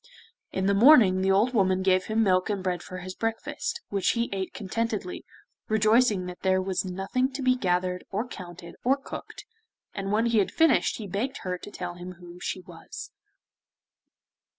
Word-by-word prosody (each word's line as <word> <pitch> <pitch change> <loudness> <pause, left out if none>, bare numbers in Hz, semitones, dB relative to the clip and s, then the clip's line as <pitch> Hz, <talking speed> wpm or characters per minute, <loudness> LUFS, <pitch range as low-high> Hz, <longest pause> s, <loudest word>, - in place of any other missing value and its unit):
In 190 - -1
the 200 - +3
morning 205 -5 +7
the 190 - +1
old 210 +6 +3
woman 190 -4 +2
gave 185 -1 +3
him 220 +1 +1
milk 185 0 +2
and 200 -3 -2
bread 180 -2 -1
for 185 - -8
his 185 +1 -6
breakfast, 225 - -3
which 200 -2 +1
he 235 0 -1
ate 190 -1 -3
contentedly, 210 -2 -3 0.4
rejoicing 215 -2 +3
that 180 0 -8
there 190 0 +3
was 185 0 -1
nothing 195 +8 -1
to 270 0 -4
be 255 0 +4
gathered, 180 -4 0
or 215 +5 -2
counted, 175 -5 -10
or 265 +3 +3
cooked, 275 - -9 0.5
and 195 0 -3
when 220 +2 +2
he 230 -2 +3
had 195 - +2
finished 325 -4 +3
he 220 - -6
begged 220 +8 -3
her 180 -1 -2
to - - -9
tell 180 -3 -5
him 175 +1 -8
who 175 0 -13
she 185 - -4
was. 175 -2 -10
195 Hz, 180 wpm, -27 LUFS, 185-225 Hz, 0.5 s, morning